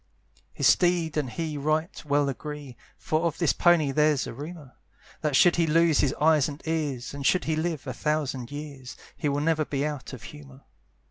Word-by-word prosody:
His - - -2
steed 175 -3 +3
and 145 -4 -1
he 155 +4 -4
right 155 +5 -1
well 145 0 +2
agree, 145 -1 -6 0.2
For 155 0 -1
of 165 -2 -1
this 170 -4 +2
pony 170 -5 +3
there's 150 -1 +2
a - - -6
rumour, 145 0 -9 0.5
That 150 -3 0
should 175 +5 +5
he 165 -1 +2
lose 165 -1 +3
his 140 - +1
eyes 155 -2 +4
and 145 0 -8
ears, 145 -7 -2
And 140 0 -6
should 180 +6 +3
he 160 - 0
live 160 -1 -2
a 130 - -4
thousand 135 -3 -2
years, 145 -2 -8 0.2
He 150 - -1
never 150 +3 +1
will 155 - -2
be 140 0 -1
out 150 -3 -5
of 130 - -9
humour. 140 -2 -12
150 Hz, 195 wpm, -26 LUFS, 140-160 Hz, 0.5 s, should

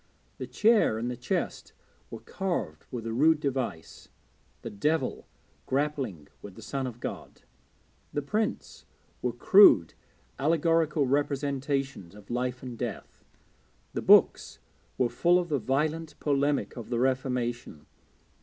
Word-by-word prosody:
The 130 - -5
chair 210 - +3
and 120 +2 -3
the - - -4
chest 120 - -3 0.4
were - - -8
carved 175 - -4
with 120 -3 -6
a 115 - -3
rude 155 +5 +4
device 130 - -4 0.5
the - - -6
Devil 135 +6 -1 0.4
grappling 135 - -2
with 100 -2 -11
the - - -12
Son 135 -2 -3
of 120 -1 -8
God. - - -7 0.7
The 145 - -3
prints 210 +8 -3 0.3
were 125 - 0
crude 120 - +6 0.5
allegorical 160 0 +2
representations 140 - -2
of 105 +1 -13
Life 125 +1 -2
and 125 -2 -6
Death. - - -6 0.7
The - - -2
books - - +4 0.4
were 125 - +2
full 175 +8 +3
of 175 -1 -2
the 145 -3 0
violent 155 +5 -2
polemic 145 0 0
of 120 - -8
the 120 - -1
Reformation. 125 - -2
135 Hz, 130 wpm, -28 LUFS, 120-150 Hz, 0.7 s, crude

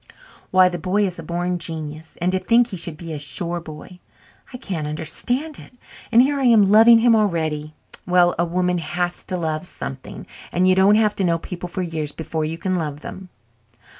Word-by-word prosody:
"Why, 185 0 +5
the 175 -1 -3
boy 195 +5 +1
is 180 -2 -4
a - - -5
born 175 +1 -2
genius 160 -1 -6
and 180 +2 +1
to 185 - 0
think 235 +4 +3
he 200 - -5
should 165 -2 -6
be 165 0 -7
a 150 - -5
shore 170 +5 -3
boy! 165 +2 -11 0.5
I 250 - -7
can't 175 - -4
understand 245 - -3
it. - - -14 0.4
And 235 +2 +7
here 280 +1 0
I 270 - 0
am 215 -5 +5
loving 225 +2 +8
him 230 0 +4
already. 160 -7 -1 0.3
Well, 180 -1 +4
a - - +4
woman 180 +1 0
has 175 +2 -3
to 185 - -3
love 160 0 -3
something 135 -6 -8 0.3
and 180 +1 +2
you 185 - +5
don't 190 +2 +5
have 215 -1 +3
to 195 - 0
know 170 -2 +2
people 180 +1 -7
for 185 +1 -3
years 160 -4 -4
before 160 0 -4
you 160 +2 -4
can 185 +2 -2
love 150 -5 -3
them." 190 +3 -9
180 Hz, 205 wpm, -21 LUFS, 160-195 Hz, 0.5 s, loving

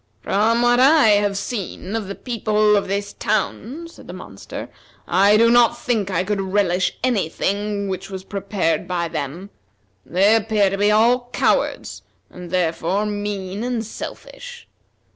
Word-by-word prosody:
"From 225 +4 +2
what 240 0 +4
I 275 -2 +6
have 205 -1 +2
seen 200 -1 -5
of 220 -4 -3
the 200 - -6
people 215 -3 +1
of 200 - 0
this 200 +1 -3
town," 300 +9 -2
said 335 - -15
the 175 - -8
monster, 100 - -9 0.4
"I 200 +4 +4
do 230 +1 +5
not 240 -1 +4
think 220 -6 -1
I 185 -2 0
could 200 +1 -1
relish 190 -2 0
any 225 -10 +1
thing 200 +3 -2
which 190 -1 -5
was 190 -1 -7
prepared 195 -5 -2
by 170 -2 -2
them. 160 +6 -5 0.5
They 195 +5 +3
appear 210 -3 +2
to 195 - -2
be 205 +1 +3
all 240 +3 +3
cowards, - - 0 0.3
and, 180 -1 -10
therefore, 180 +3 0
mean 205 -1 -4
and 240 -2 -2
selfish. - - -9
205 Hz, 155 wpm, -21 LUFS, 190-225 Hz, 0.5 s, I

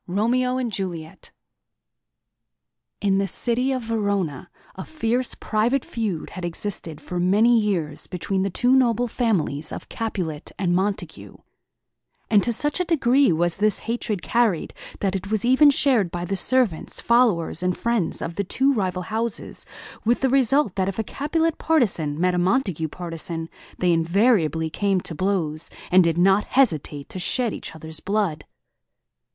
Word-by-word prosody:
ROMEO 245 +7 +1
AND 250 -3 -2
JULIET 175 -5 -6 1.7
In 195 -1 +2
the 195 - 0
city 245 +5 -1
of 255 -2 -2
Verona, 200 - -2 0.2
a 190 - -7
fierce 250 -4 -1
private 235 +5 0
feud 210 -8 -3
had 185 - -7
existed 170 -2 -5
for 175 +4 -5
many 210 +7 +4
years 170 -9 -2
between 190 +2 -2
the 195 - 0
two 245 +7 +1
noble 245 -2 +3
families 190 - -1
of - - -8
Capulet 180 -9 -4
and 175 -3 +1
Montague; 195 +2 -3 1.0
and 210 -2 +6
to 240 - -1
such 295 +8 -1
a - - +2
degree 275 - +3
was 170 +1 0
this 210 +1 +2
hatred 225 -4 -2
carried 230 -8 +1 0.3
that 195 -1 0
it 195 +1 -4
was 215 0 0
even 260 +4 +6
shared 260 -9 +2
by 175 +1 -4
the 195 - -2
servants, 220 -3 0
followers, 220 -9 +2
and 180 0 0
friends 235 -7 -1
of 165 - -5
the 200 - +1
two 265 +8 +1
rival 185 -5 -1
houses, 225 +2 -4 0.4
with 235 +2 +1
the 265 - +2
result 270 -3 +3
that 190 -1 +1
if 195 - -6
a 225 - 0
Capulet 320 - -1
partisan 180 - +1
met 180 +1 +2
a 180 - +1
Montague 180 - +1
partisan, 165 0 -5 0.3
they 180 -1 +2
invariably 165 - +2
came 200 0 +1
to 165 - -5
blows, 165 -3 -1 0.2
and 185 0 +7
did 170 -1 +1
not 195 +3 +4
hesitate 155 - 0
to 185 - -6
shed 235 +4 0
each - - -7
other's 160 0 -6
blood. 195 -5 -1
200 Hz, 155 wpm, -23 LUFS, 175-240 Hz, 1.7 s, and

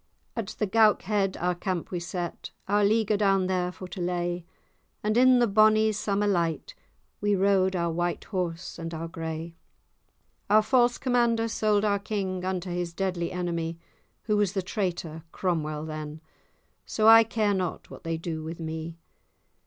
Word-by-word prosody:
At 230 -4 -3
the 210 - +1
Goukhead 205 -2 +2
our 180 +1 +1
camp 175 -1 -3
we 180 - -2
set, 175 0 -5 0.2
Our 205 +1 +3
leaguer 215 0 +2
down 195 -2 +3
there 180 -1 0
for 180 +2 -9
to 180 - -6
lay; 175 -1 -2 0.6
And, 215 +1 +1
in 255 +1 +6
the 240 - +4
bonny 215 +1 +4
summer 205 -1 -1
light, 175 - 0 0.5
We 205 0 +2
rode 190 -1 +2
our 170 -1 0
white 175 +1 -2
horse 180 -3 -4
and 165 0 -5
our 165 +1 -4
gray. 165 0 -6 0.9
Our 215 +1 +6
false 240 0 +3
commander 235 -3 +2
sold 215 -2 +1
our 200 -1 +2
king, 195 -3 -3
Unto 185 -1 -2
his 175 -1 -3
deadly 180 -2 -1
enemie, 170 -2 -3 0.5
Who 210 -2 +1
was 205 -2 +1
the 190 - -1
traitor, 175 -5 -3
Cromwell, 155 -4 -2
then; 155 0 -6 0.6
So 215 0 +1
I 225 0 +10
care 215 -2 0
not 185 -3 -3
what - - -11
they 165 0 -2
do 160 -1 -5
with 165 +2 -6
me. 160 0 -5
185 Hz, 160 wpm, -27 LUFS, 170-210 Hz, 0.9 s, I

